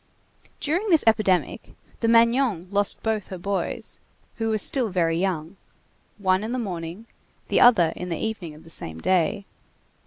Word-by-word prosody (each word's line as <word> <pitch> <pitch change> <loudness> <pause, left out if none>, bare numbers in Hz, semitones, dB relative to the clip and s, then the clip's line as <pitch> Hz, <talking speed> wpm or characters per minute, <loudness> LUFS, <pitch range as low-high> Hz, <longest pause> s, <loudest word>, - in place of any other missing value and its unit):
During 355 +9 -1
this 325 -4 +4
epidemic, 215 -5 +1 0.3
the 230 - 0
Magnon 230 -5 +3
lost 205 0 +1
both 220 -3 -1
her 185 - -7
boys, 190 0 -3 0.4
who 225 -1 -1
were 220 - +1
still 240 +3 +2
very 170 -3 +1
young, 175 0 -2 0.6
one 190 -1 +1
in 225 +3 -3
the - - -1
morning, 180 -2 -5 0.4
the - - +3
other 180 -10 +6
in 180 - -6
the 165 - -2
evening 200 -8 -4
of 155 - -15
the 165 - -13
same 80 - -4
day. 190 - +1
200 Hz, 160 wpm, -24 LUFS, 175-225 Hz, 0.6 s, other